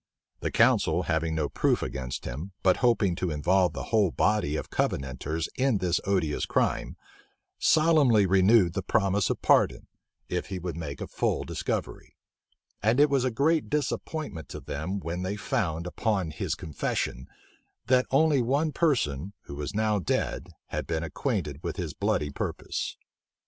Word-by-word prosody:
The -, -, -2 dB
council, 85 Hz, +3 st, +3 dB
having 80 Hz, -1 st, 0 dB
no 75 Hz, -2 st, 0 dB
proof -, -, +1 dB
against 65 Hz, -2 st, -5 dB
him, 80 Hz, +11 st, -6 dB
but 95 Hz, -1 st, +4 dB
hoping 115 Hz, -7 st, +3 dB
to 90 Hz, -2 st, -1 dB
involve 85 Hz, +3 st, +2 dB
the -, -, -5 dB
whole 105 Hz, -4 st, +4 dB
body 105 Hz, -4 st, +1 dB
of -, -, -5 dB
Covenanters 70 Hz, +5 st, -2 dB
in 130 Hz, -4 st, +2 dB
this 90 Hz, -2 st, +1 dB
odious 90 Hz, -7 st, 0 dB
crime, -, -, 0 dB, 0.6 s
solemnly 150 Hz, -10 st, +4 dB
renewed 95 Hz, 0 st, +4 dB
the 95 Hz, -, -1 dB
promise 100 Hz, 0 st, +1 dB
of -, -, -3 dB
pardon, -, -, +3 dB, 0.4 s
if 90 Hz, -, -2 dB
he 95 Hz, -, -4 dB
would 90 Hz, -2 st, -4 dB
make 75 Hz, -4 st, -6 dB
a -, -, -4 dB
full -, -, -1 dB
discovery; -, -, -4 dB, 0.7 s
and 110 Hz, +5 st, +2 dB
it 145 Hz, 0 st, +5 dB
was 135 Hz, -2 st, +2 dB
a 130 Hz, -, +2 dB
great 150 Hz, +6 st, +1 dB
disappointment 150 Hz, -, -3 dB
to -, -, -6 dB
them, 90 Hz, +8 st, -4 dB
when 85 Hz, 0 st, -4 dB
they 95 Hz, +2 st, -2 dB
found, 85 Hz, -5 st, -1 dB
upon 95 Hz, -2 st, -1 dB
his -, -, -2 dB
confession, 65 Hz, -4 st, -3 dB, 0.6 s
that 130 Hz, 0 st, +3 dB
only 145 Hz, 0 st, +4 dB
one 140 Hz, +6 st, +1 dB
person, 100 Hz, -, 0 dB
who -, -, -10 dB
was 75 Hz, +7 st, -5 dB
now 110 Hz, -1 st, +2 dB
dead, 90 Hz, -, -1 dB, 0.2 s
had -, -, -3 dB
been 80 Hz, -1 st, -1 dB
acquainted 75 Hz, -2 st, -3 dB
with 85 Hz, -, -3 dB
his 85 Hz, -6 st, -4 dB
bloody 100 Hz, -8 st, 0 dB
purpose. -, -, -4 dB
95 Hz, 160 wpm, -27 LUFS, 80-115 Hz, 0.7 s, it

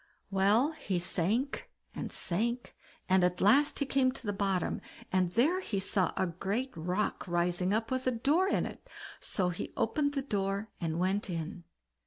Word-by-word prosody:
Well, 205 Hz, +9 st, +3 dB
he 205 Hz, -, -3 dB
sank 200 Hz, -, +1 dB, 0.2 s
and -, -, -5 dB
sank, 235 Hz, +7 st, +1 dB, 0.3 s
and 185 Hz, -1 st, +4 dB
at 180 Hz, 0 st, +1 dB
last 275 Hz, +9 st, +4 dB
he 285 Hz, -, +1 dB
came 265 Hz, -1 st, +2 dB
to 255 Hz, -, -11 dB
the 205 Hz, -, -1 dB
bottom, 195 Hz, -2 st, -1 dB, 0.3 s
and 185 Hz, -2 st, +2 dB
there 310 Hz, +11 st, +3 dB
he 210 Hz, -, -2 dB
saw 190 Hz, -1 st, +1 dB
a -, -, +2 dB
great 200 Hz, +9 st, -3 dB
rock 180 Hz, +6 st, -2 dB
rising 175 Hz, +1 st, 0 dB
up 225 Hz, +3 st, 0 dB
with 260 Hz, 0 st, -1 dB
a -, -, +4 dB
door 290 Hz, +10 st, +2 dB
in -, -, +1 dB
it, -, -, -9 dB, 0.3 s
so 185 Hz, -3 st, -1 dB
he 175 Hz, -, -5 dB
opened 285 Hz, +5 st, 0 dB
the 275 Hz, -, -1 dB
door 200 Hz, -3 st, -2 dB
and 165 Hz, -1 st, -1 dB
went 190 Hz, +3 st, 0 dB
in. 170 Hz, +1 st, -5 dB
200 Hz, 175 wpm, -31 LUFS, 180-255 Hz, 0.3 s, and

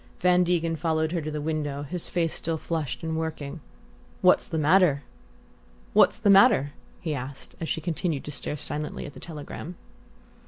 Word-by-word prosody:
Van 180 Hz, 0 st, +4 dB
Degen 170 Hz, -2 st, +1 dB
followed 160 Hz, -1 st, 0 dB
her 170 Hz, -2 st, -1 dB
to 155 Hz, -, -4 dB
the 150 Hz, 0 st, -3 dB
window, 145 Hz, -2 st, -2 dB
his 170 Hz, +4 st, -4 dB
face 165 Hz, -2 st, 0 dB
still 165 Hz, 0 st, -2 dB
flushed 160 Hz, -2 st, -3 dB
and 160 Hz, 0 st, -2 dB
working. 160 Hz, -1 st, -4 dB, 0.6 s
"What's -, -, +5 dB
the 160 Hz, -, -3 dB
matter?" 155 Hz, -2 st, +4 dB, 2.0 s
he 160 Hz, -4 st, -2 dB
asked, 135 Hz, 0 st, -7 dB
as 165 Hz, -, -3 dB
she 160 Hz, -, -1 dB
continued 160 Hz, -2 st, -2 dB
to 150 Hz, -, -6 dB
stare 150 Hz, +1 st, -3 dB
silently 150 Hz, +2 st, -4 dB
at 145 Hz, -, -8 dB
the -, -, -11 dB
telegram. 160 Hz, +2 st, -8 dB
160 Hz, 155 wpm, -26 LUFS, 150-165 Hz, 2.0 s, What's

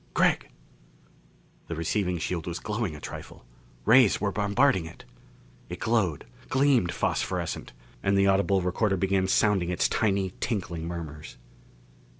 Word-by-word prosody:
"Gregg!" -, -, +2 dB, 1.2 s
The 85 Hz, -, -4 dB
receiving 90 Hz, +3 st, -1 dB
shield 85 Hz, 0 st, -3 dB
was 85 Hz, -, -3 dB
glowing 105 Hz, -6 st, -3 dB
a -, -, -9 dB
trifle. -, -, -9 dB, 0.4 s
Rays 125 Hz, -4 st, +6 dB
were 100 Hz, 0 st, 0 dB
bombarding 100 Hz, -4 st, +2 dB
it! 85 Hz, -, -13 dB, 0.6 s
It -, -, -6 dB
glowed, 100 Hz, -10 st, 0 dB, 0.2 s
gleamed 130 Hz, -9 st, +3 dB
phosphorescent, -, -, -2 dB, 0.3 s
and 100 Hz, 0 st, +2 dB
the 100 Hz, -, +4 dB
audible 95 Hz, -1 st, +2 dB
recorder 95 Hz, +2 st, +1 dB
began 95 Hz, 0 st, +1 dB
sounding 95 Hz, -2 st, +2 dB
its 90 Hz, -, +1 dB
tiny 95 Hz, -3 st, 0 dB
tinkling 90 Hz, -7 st, -3 dB
murmurs. 80 Hz, -3 st, -7 dB
95 Hz, 130 wpm, -27 LUFS, 85-105 Hz, 1.2 s, Rays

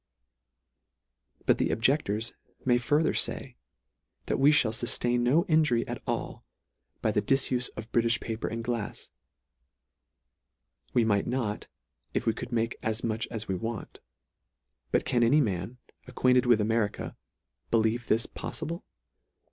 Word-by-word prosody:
But -, -, +3 dB
the -, -, +2 dB
objectors 115 Hz, -3 st, +1 dB, 0.3 s
may 120 Hz, -1 st, +4 dB
further 145 Hz, +5 st, +2 dB
fay, -, -, -2 dB, 0.7 s
that -, -, 0 dB
we 140 Hz, +2 st, +6 dB
(hall 130 Hz, -7 st, +3 dB
fuftain 120 Hz, +1 st, +1 dB
no 140 Hz, +9 st, +3 dB
injury 155 Hz, -9 st, +3 dB
at -, -, -5 dB
all -, -, -3 dB, 0.6 s
by -, -, +3 dB
the -, -, +1 dB
difufe 130 Hz, -2 st, +1 dB
of 110 Hz, +1 st, -7 dB
Britifh 115 Hz, 0 st, +3 dB
paper 110 Hz, 0 st, -4 dB
and 115 Hz, 0 st, -4 dB
glafs. 115 Hz, -3 st, -4 dB, 1.8 s
We 120 Hz, -, +4 dB
might 100 Hz, -2 st, +2 dB
not, 120 Hz, -5 st, -2 dB, 0.5 s
if -, -, 0 dB
we 115 Hz, -, +3 dB
could 120 Hz, -, -7 dB
make 115 Hz, 0 st, -1 dB
as 110 Hz, 0 st, -1 dB
much 110 Hz, -1 st, -1 dB
as 110 Hz, -2 st, -5 dB
we 95 Hz, -, -1 dB
want. 110 Hz, +4 st, -5 dB, 0.9 s
But -, -, +2 dB
can 120 Hz, -, +1 dB
any 120 Hz, +6 st, +5 dB
man, 105 Hz, -, -1 dB, 0.3 s
acquainted 125 Hz, 0 st, +3 dB
with 120 Hz, -3 st, +5 dB
Ameri 110 Hz, -1 st, +1 dB
ca, -, -, -7 dB, 0.5 s
believe 115 Hz, +1 st, +1 dB
this 115 Hz, +3 st, +2 dB
poffible? 170 Hz, +3 st, -5 dB
120 Hz, 140 wpm, -29 LUFS, 110-125 Hz, 1.8 s, we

